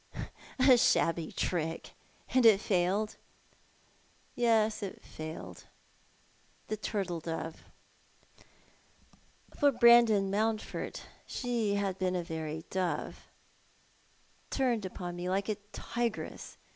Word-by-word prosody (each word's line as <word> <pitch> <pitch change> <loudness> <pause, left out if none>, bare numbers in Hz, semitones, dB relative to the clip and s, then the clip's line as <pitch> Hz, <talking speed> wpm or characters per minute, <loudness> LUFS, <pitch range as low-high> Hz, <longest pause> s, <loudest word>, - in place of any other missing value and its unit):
" - - -20
A 255 -1 +7
shabby 165 -6 +2
trick— 165 -2 -2 0.4
and 255 -1 +5
it 220 -4 +7
failed 200 +2 0 0.4
'? - - -34
" - - -34 0.2
" - - -34 0.2
Yes, 225 -2 +2
it 195 -2 -6
failed— 155 +1 -8 1.0
the 215 - 0
turtle 195 -5 -3
dove 165 0 -5 0.9
— - - -27
for 285 -1 +5
Brandon 235 -5 +6
Mountford 215 +1 -2 0.3
she 235 -5 -1
had 195 -2 -1
been 185 -1 0
a 175 - -1
very 160 -1 -5
dove 185 -2 -2 0.6
— - - -35
turned 245 -6 0
upon 175 -1 -5
me 175 +1 -3
like 195 +3 0
a 210 - 0
tigress. 235 -2 -4
200 Hz, 120 wpm, -31 LUFS, 175-225 Hz, 1.0 s, A